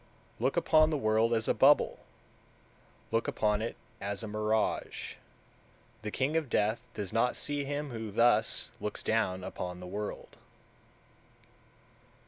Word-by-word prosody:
170. - - -6
Look 135 +6 +1
upon 155 -2 +5
the 155 - 0
world 110 -2 +2
as 110 -1 +1
a - - +3
bubble, 145 +2 +4 1.1
look 115 - +1
upon 105 0 +1
it 115 - -3 0.3
as 100 +2 -3
a - - -4
mirage: 110 +1 -1 0.9
the 105 - -4
king 135 +7 -1
of 160 -5 0
death 110 +1 0
does 105 -1 -4
not 120 +2 +2
see 145 -1 -1
him 145 0 -3
who 110 -2 -5
thus 120 +4 +3
looks 105 - -4
down 95 -5 0
upon 90 -1 -5
the 90 - -8
world. 105 +3 -6
110 Hz, 140 wpm, -31 LUFS, 105-135 Hz, 1.1 s, upon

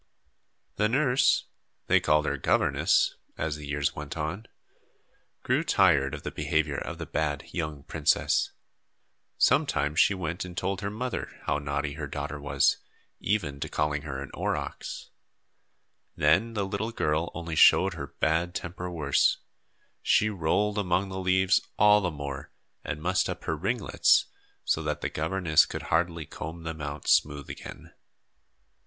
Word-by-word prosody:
The 105 +1 +2
nurse 135 +1 +3 0.4
they - - +4
called 75 0 +2
her - - 0
"governess," - - +2 0.2
as 80 -2 -2
the 75 -1 -9
years 70 0 -1
went 75 +1 -6
on 85 +8 -4 1.0
grew 130 +6 +1
tired 85 - +3
of - - -10
the - - -4
behavior 75 -2 0
of - - -6
the - - -5
bad 75 -1 -2
young 75 -4 -4
princess. 75 -1 +1 0.9
Sometimes 75 +3 +2
she 100 - +5
went 85 -1 -3
and 90 -1 -9
told 95 +1 -2
her 100 - -2
mother 125 +4 -4
how 75 0 0
naughty 70 0 -2
her 75 0 -5
daughter 75 +1 -5
was, 70 -1 +2 0.4
even 85 -9 -1
to - - -4
calling 75 -1 0
her 70 -2 -5
an 70 - -10
aurochs. - - -4 1.0
Then 85 +10 +3
the 100 -2 0
little 100 +4 -3
girl 80 -5 0
only 85 -2 -4
showed - - +6
her - - -6
bad 85 +3 0
temper 90 +1 -5
worse. 75 -6 +2 0.6
She 110 0 +3
rolled 105 +4 0
among 95 0 0
the 95 0 -5
leaves 95 0 +3 0.2
all 105 0 +6
the 90 - 0
more 70 -3 -6 0.3
and 75 - -5
mussed 95 +2 +1
up - - -5
her - - -1
ringlets, - - +2 0.4
so 80 - +1
that 75 -1 -3
the - - -1
governess 80 0 +2
could - - -6
hardly 85 -1 +1
comb 80 +4 -7
them 80 -1 -5
out 70 0 -6
smooth 75 -2 +2
again. - - -10
80 Hz, 150 wpm, -28 LUFS, 75-95 Hz, 1.0 s, showed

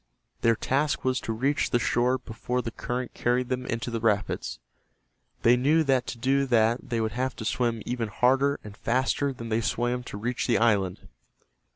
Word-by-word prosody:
Their 115 0 +4
task 145 +6 0
was 130 0 +2
to - - -4
reach 135 +6 0
the - - +3
shore 125 +1 +2
before 125 +1 -3
the 115 - -4
current 125 +1 -4
carried 125 +1 0
them 130 0 -2
into 115 +1 -3
the 115 - -2
rapids. 105 - 0 0.9
They 120 +1 +6
knew 150 +6 +3
that 130 -4 +1
to - - -5
do 135 +3 +1
that 115 -1 +2
they 115 - 0
would 110 -1 0
have 130 +4 -2
to 110 - -7
swim 115 -1 0
even 120 -2 -2
harder 135 +6 +2
and 105 -1 -10
faster 130 +5 0
than 115 -3 -7
they 110 +1 +1
swam 120 +2 -1
to 100 - -7
reach 120 +4 -2
the 120 - +3
island. 100 -6 +1
120 Hz, 190 wpm, -27 LUFS, 115-130 Hz, 0.9 s, They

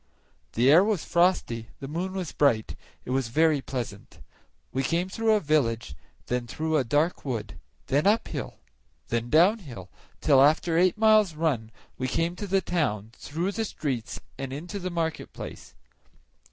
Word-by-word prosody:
The 125 +4 +4
air 170 +5 +7
was 205 -5 0
frosty, 170 -11 +1
the 135 - -6
moon 175 +6 -3
was 185 -5 -4
bright; 110 - +1 0.3
it - - -5
was 130 -2 0
very 155 +3 +3
pleasant. 120 -7 -6 0.5
We 135 - -1
came 170 +7 0
through 225 +2 +1
a 215 - +4
village, 120 - 0 0.3
then 125 -1 -2
through 160 +6 -2
a 140 - +2
dark 145 +8 0
wood, 125 -6 -4 0.3
then 145 +7 +1
uphill, 200 - 0 0.5
then 120 0 -1
downhill, 155 - +2 0.3
till 140 -4 +5
after 155 +3 +3
eight 180 +3 +3
miles' 215 -5 +4
run 145 -9 -1 0.3
we 130 - -1
came 165 +6 -1
to 205 - -5
the 195 0 +2
town, 110 - -1
through 170 +6 -3
the 225 +2 -2
streets 135 - -4 0.2
and 135 -1 -4
into 170 +8 -5
the 185 -1 -3
market 165 -2 -3
place. - - -9
155 Hz, 160 wpm, -27 LUFS, 125-180 Hz, 0.5 s, air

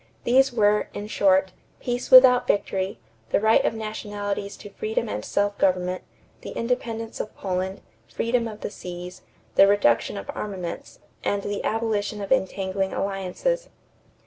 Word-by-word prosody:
These 265 +3 +4
were, 210 -3 +2
in 205 - -4
short: 190 -2 +3 0.3
"peace 245 0 -3
without 255 -1 +8
victory"; 195 -1 0 0.3
the - - +2
right 220 +2 +4
of - - 0
nationalities 205 -2 -4
to 205 - -11
freedom 440 - -2
and - - -4
self 205 0 0
government; 185 -1 +1 0.4
the - - -7
independence 230 -2 -3
of 215 - -5
Poland; 190 0 -3 0.3
freedom 230 - 0
of 215 -1 -9
the - - -4
seas; 180 0 -8 0.3
the 195 - +7
reduction 200 - +2
of 100 - -6
armaments; 185 -5 -6 0.3
and 200 -1 0
the 205 0 -3
abolition 215 -2 -1
of 200 -1 -6
entangling 190 0 0
alliances. 200 - -2
205 Hz, 145 wpm, -24 LUFS, 190-225 Hz, 0.4 s, without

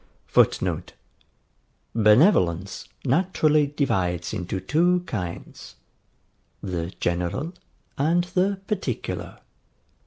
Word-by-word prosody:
[Footnote: - - +1 1.0
Benevolence 105 - +3 0.2
naturally 155 0 +3
divides 95 - -1
into 90 +1 -3
two 175 - +2
kinds, 90 - -6 0.8
the 90 -3 -4
GENERAL 90 - -1 0.5
and 165 +5 +3
the 190 +2 0
PARTICULAR. 205 -1 -3
135 Hz, 70 wpm, -24 LUFS, -, 1.0 s, Benevolence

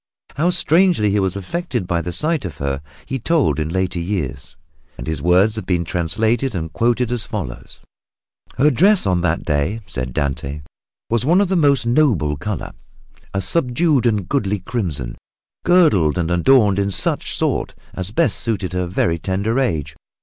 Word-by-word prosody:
How 160 +6 +2
strangely 175 - +3
he 105 - +2
was 95 -1 0
affected 120 - -3
by 85 -2 -1
the 90 +2 -4
sight 155 - 0
of 80 -6 -6
her 70 0 -2 0.2
he 135 - -3
told 125 - +1
in 75 0 -2
later 95 0 -1
years, 85 -5 -4 0.4
and - - -7
his 80 -3 -3
words 95 +7 +3
have 110 - -5
been 85 -2 0
translated 110 - 0
and 80 -2 -4
quoted 120 0 +1
as 120 -2 0
follows: 100 - -6 0.8
"Her 150 +4 +4
dress, 190 - +4
on 90 -2 +1
that 85 -1 -1
day," 75 +9 -1
said 65 -1 -4
Dante, 70 +1 -3 0.5
"was 115 0 +2
of 180 +6 +3
a - - +2
most 140 -7 +3
noble 115 - +2
color, - - -5 0.6
a 95 - -1
subdued 140 - +2
and 105 -5 0
goodly 105 -7 0
crimson, 85 - -4 0.5
girdled 130 - +4
and 85 -1 -1
adorned 100 +2 +4
in 100 0 +1
such 100 - -1
sort - - -1 0.2
as 95 0 -2
best 155 +9 +1
suited 100 -6 -2
her 90 -1 -1
very 85 -2 0
tender 100 +8 -1
age. 80 - -1
100 Hz, 165 wpm, -19 LUFS, 85-130 Hz, 0.8 s, Her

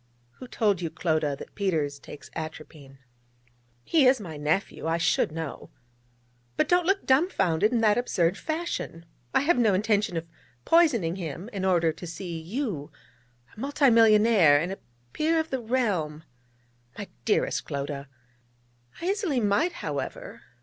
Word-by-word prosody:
Who 255 - -9
told 205 -7 0
you, 165 - -2
Clodagh, 155 -3 -1
that - - -11
Peters 155 -8 -1
takes 145 - -12
atropine?' 155 -3 -8 0.9
'He 295 - +4
is 260 0 +4
my 170 -7 -7
nephew: 155 +3 -2
I 165 +1 +1
should 165 - +1
know. 160 -2 -6 0.9
But - - +2
don't 355 -1 +2
look 390 +1 +1
dumbfoundered 215 - +2
in 235 -2 +1
that 215 +1 +4
absurd 180 -7 +1
fashion: 315 - -4 0.3
I - - +3
have 295 -1 +2
no 215 -5 +3
intention 205 -3 +1
of 165 +1 -4 0.4
poisoning 235 - +3
him 175 +3 -6
in 195 -2 -3
order 170 -3 +3
to 175 - -9
see 170 0 -6
you 185 - -4 0.6
a - - -13
multimillionaire, 225 - +5
and 170 +5 -2
a 195 - -6 0.3
Peer 325 +1 +1
of 320 0 -3
the 265 -2 -2
Realm....' 200 -11 -1 0.7
'My 205 - -6 0.2
dearest 215 - +1
Clodagh!' 140 -1 -5 0.9
'I - - -4
easily 385 - 0
might, 210 - +1
however. - - -5
200 Hz, 145 wpm, -26 LUFS, 160-255 Hz, 0.9 s, multimillionaire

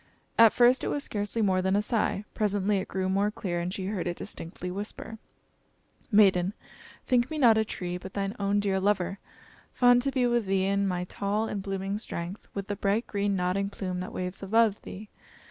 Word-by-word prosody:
At 230 -1 +7
first 245 +1 +4
it - - -1
was 290 - -1
scarcely 210 +2 -2
more 185 -2 +2
than 190 +1 +1
a 205 - +3
sigh; 210 -2 0
presently 205 -1 +1
it 190 - -5
grew 190 -1 -2
more 195 +2 +2
clear, 180 -4 -3
and 175 +1 -2
she 190 0 -4
heard 195 -3 -2
it 175 - -3
distinctly 180 +2 -6
whisper 210 +3 -6 0.9
"Maiden! 195 -3 +4 0.5
think 245 0 +2
me 315 - -4
not 240 -6 +6
a 220 - +3
tree; 180 -4 -5
but 190 +1 -10
thine 200 +1 -2
own 200 0 +1
dear 195 -2 +1
lover; 195 -1 0 0.6
fond 245 -1 +5
to 275 +2 0
be 255 -2 +1
with 240 -3 +1
thee 190 0 +2
in 200 0 +1
my 180 -1 -1
tall 205 +4 -2
and 205 - -3
blooming 195 +1 -3
strength, 175 -1 -6
with 200 -1 -3
the 205 - -3
bright 205 +3 0
green 200 -1 -1
nodding 185 +2 0
plume 185 -3 -4
that 185 - -5
waves 180 +1 -4
above 215 +1 +2
thee. 210 +3 -9
200 Hz, 200 wpm, -28 LUFS, 190-215 Hz, 0.9 s, At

